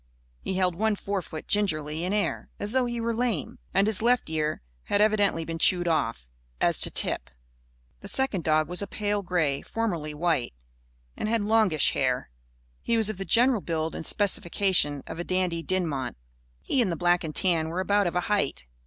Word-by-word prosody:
He 190 Hz, -, -4 dB
held 185 Hz, -1 st, +1 dB
one 215 Hz, +4 st, 0 dB
forefoot 195 Hz, -6 st, -5 dB
gingerly 160 Hz, -6 st, 0 dB
in 180 Hz, -, -2 dB
air, 210 Hz, 0 st, -1 dB
as 205 Hz, -, -2 dB
though 260 Hz, 0 st, +2 dB
he 240 Hz, 0 st, -4 dB
were 230 Hz, 0 st, -1 dB
lame. 230 Hz, -, -2 dB
And 195 Hz, +1 st, +3 dB
his 215 Hz, -2 st, +3 dB
left 240 Hz, -7 st, +1 dB
ear 155 Hz, -, -2 dB, 0.2 s
had 205 Hz, -, 0 dB
evidently 205 Hz, -6 st, +2 dB
been 165 Hz, 0 st, -5 dB
chewed 175 Hz, +1 st, +3 dB
off, 130 Hz, -, -1 dB, 0.3 s
as -, -, +3 dB
to -, -, +5 dB
tip. -, -, -1 dB, 0.7 s
The -, -, -10 dB
second 265 Hz, -10 st, +2 dB
dog 155 Hz, -1 st, +2 dB
was 180 Hz, +3 st, 0 dB
a 200 Hz, -, -4 dB
pale 205 Hz, 0 st, -2 dB
grey 160 Hz, -7 st, 0 dB
formerly 170 Hz, -10 st, -3 dB
white 150 Hz, -, -1 dB, 0.6 s
and 215 Hz, -, -3 dB
had 225 Hz, -2 st, +1 dB
longish 210 Hz, -8 st, +3 dB
hair. 125 Hz, -, -1 dB, 0.5 s
He 230 Hz, -, 0 dB
was 220 Hz, -1 st, +2 dB
of 195 Hz, -, -10 dB
the 195 Hz, -, -4 dB
general 240 Hz, 0 st, +4 dB
build 160 Hz, -2 st, -3 dB
and -, -, -6 dB
specifications 185 Hz, -7 st, +3 dB
of 165 Hz, -, -8 dB
a -, -, -2 dB
Dandy 180 Hz, -2 st, -1 dB
Dinmont. 160 Hz, -, -2 dB, 0.5 s
He 265 Hz, -, +1 dB
and 205 Hz, -6 st, 0 dB
the -, -, -2 dB
black 175 Hz, +1 st, +1 dB
and 155 Hz, -2 st, -6 dB
tan 165 Hz, -4 st, +1 dB
were 170 Hz, +3 st, -3 dB
about 200 Hz, +1 st, +2 dB
of 175 Hz, -, -3 dB
a 180 Hz, -, +2 dB
height. 175 Hz, -, -1 dB
185 Hz, 190 wpm, -26 LUFS, 160-210 Hz, 0.7 s, to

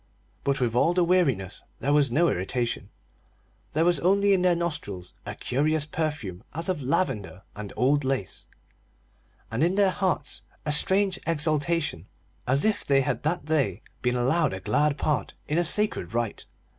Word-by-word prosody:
But 140 Hz, -1 st, +1 dB
with 120 Hz, -3 st, 0 dB
all 165 Hz, +8 st, +3 dB
the 180 Hz, -, +4 dB
weariness, 140 Hz, -, +1 dB, 0.2 s
there 140 Hz, +2 st, +1 dB
was 145 Hz, -4 st, +4 dB
no 170 Hz, +7 st, +3 dB
irritation; 120 Hz, -, -2 dB, 0.8 s
there 160 Hz, +2 st, +2 dB
was 175 Hz, 0 st, +3 dB
only 200 Hz, +3 st, +3 dB
in 190 Hz, -, +3 dB
their 180 Hz, -1 st, +4 dB
nostrils 145 Hz, -, -4 dB
a -, -, -4 dB
curious 150 Hz, +4 st, 0 dB
perfume 150 Hz, -, -3 dB
as 165 Hz, +4 st, -3 dB
of 180 Hz, -5 st, -1 dB
lavender 125 Hz, -, -1 dB
and 105 Hz, -1 st, -7 dB
old 140 Hz, +4 st, +3 dB
lace, 130 Hz, -8 st, -3 dB, 1.0 s
and 120 Hz, +6 st, 0 dB
in 175 Hz, +3 st, +2 dB
their 200 Hz, -2 st, +4 dB
hearts 185 Hz, -1 st, -1 dB, 0.2 s
a 150 Hz, -, 0 dB
strange 190 Hz, +5 st, +2 dB
exaltation 155 Hz, -, 0 dB, 0.4 s
as 135 Hz, +3 st, +3 dB
if 215 Hz, -1 st, +1 dB
they 135 Hz, -1 st, +3 dB
had 130 Hz, -3 st, -1 dB
that 155 Hz, +1 st, -1 dB
day 135 Hz, -, 0 dB, 0.2 s
been 125 Hz, 0 st, +1 dB
allowed 135 Hz, -, +2 dB
a 95 Hz, -, -4 dB
glad 140 Hz, +9 st, +1 dB
part 140 Hz, -10 st, -1 dB
in 155 Hz, +3 st, +1 dB
a -, -, +3 dB
sacred 205 Hz, -, 0 dB
rite. 120 Hz, -3 st, -2 dB
150 Hz, 165 wpm, -26 LUFS, 120-170 Hz, 1.0 s, the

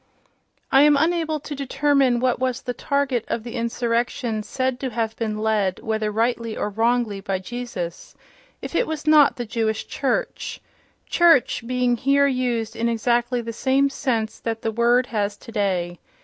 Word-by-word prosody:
I 270 Hz, -, +6 dB
am 295 Hz, 0 st, +6 dB
unable 320 Hz, 0 st, +1 dB
to 300 Hz, -, -6 dB
determine 275 Hz, -2 st, +2 dB
what 250 Hz, -1 st, +1 dB
was 255 Hz, 0 st, -1 dB
the 250 Hz, -, -3 dB
target 280 Hz, -4 st, -1 dB
of 225 Hz, -, -2 dB
the 235 Hz, 0 st, -7 dB
insurrection 235 Hz, -1 st, -1 dB
said 255 Hz, +3 st, -2 dB
to 265 Hz, -, -2 dB
have 225 Hz, -1 st, -2 dB
been 220 Hz, -2 st, -3 dB
led 215 Hz, -4 st, 0 dB
(whether 220 Hz, -1 st, -1 dB
rightly 230 Hz, +1 st, -1 dB
or 210 Hz, -, -2 dB
wrongly) 225 Hz, -1 st, +1 dB
by 195 Hz, -1 st, -2 dB
Jesus, 190 Hz, -4 st, -6 dB, 0.5 s
if -, -, -6 dB
it -, -, +1 dB
was 310 Hz, -1 st, -4 dB
not 305 Hz, -2 st, +6 dB
the 240 Hz, -, -4 dB
Jewish 220 Hz, 0 st, -1 dB
church—"church" 330 Hz, -, 0 dB
being 250 Hz, -1 st, +1 dB
here 280 Hz, +3 st, +3 dB
used 245 Hz, -4 st, -1 dB
in 230 Hz, +1 st, 0 dB
exactly 240 Hz, +1 st, +1 dB
the 230 Hz, 0 st, -6 dB
same 270 Hz, +3 st, +2 dB
sense 230 Hz, -6 st, -2 dB
that 225 Hz, -1 st, -4 dB
the 225 Hz, -, 0 dB
word 240 Hz, +2 st, +3 dB
has 205 Hz, -1 st, -1 dB
today. 190 Hz, -6 st, -2 dB
240 Hz, 160 wpm, -23 LUFS, 220-265 Hz, 0.5 s, I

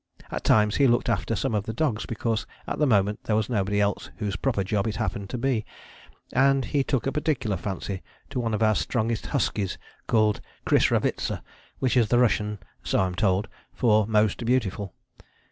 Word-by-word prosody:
At -, -, -4 dB
times 105 Hz, -1 st, +4 dB
he 140 Hz, -, +5 dB
looked 120 Hz, 0 st, +2 dB
after 115 Hz, +1 st, 0 dB
some 100 Hz, +3 st, -1 dB
of 105 Hz, -1 st, 0 dB
the 110 Hz, -, -2 dB
dogs 120 Hz, -7 st, 0 dB
because 115 Hz, -1 st, -2 dB, 0.2 s
at -, -, -4 dB
the 150 Hz, -, +3 dB
moment 105 Hz, -3 st, +2 dB
there 110 Hz, -, +1 dB
was 110 Hz, +1 st, 0 dB
nobody 100 Hz, -2 st, +1 dB
else 100 Hz, -1 st, 0 dB
whose 105 Hz, -1 st, -2 dB
proper 115 Hz, -4 st, 0 dB
job 100 Hz, +2 st, 0 dB
it 110 Hz, -, -2 dB
happened 100 Hz, -1 st, -3 dB
to -, -, -3 dB
be, 120 Hz, -3 st, 0 dB, 0.7 s
and 135 Hz, 0 st, +3 dB
he 140 Hz, +4 st, +1 dB
took 135 Hz, -3 st, -1 dB
a 135 Hz, -, +1 dB
particular 135 Hz, -7 st, 0 dB
fancy 95 Hz, +1 st, -4 dB, 0.3 s
to 130 Hz, -, -2 dB
one 115 Hz, -2 st, 0 dB
of 110 Hz, -, 0 dB
our 110 Hz, 0 st, +4 dB
strongest 115 Hz, 0 st, -1 dB
huskies 105 Hz, -8 st, -1 dB, 0.3 s
called 110 Hz, -2 st, +2 dB, 0.2 s
Krisravitza, -, -, +1 dB, 0.3 s
which 130 Hz, -2 st, 0 dB
is 120 Hz, -4 st, +4 dB
the 120 Hz, -, +4 dB
Russian 105 Hz, -3 st, +2 dB, 0.2 s
(so -, -, 0 dB
I'm 95 Hz, -1 st, +1 dB
told) 95 Hz, +1 st, +1 dB, 0.3 s
for 110 Hz, -3 st, +3 dB
'most 105 Hz, 0 st, +2 dB
beautiful.' 110 Hz, -6 st, 0 dB
110 Hz, 185 wpm, -26 LUFS, 105-120 Hz, 0.7 s, he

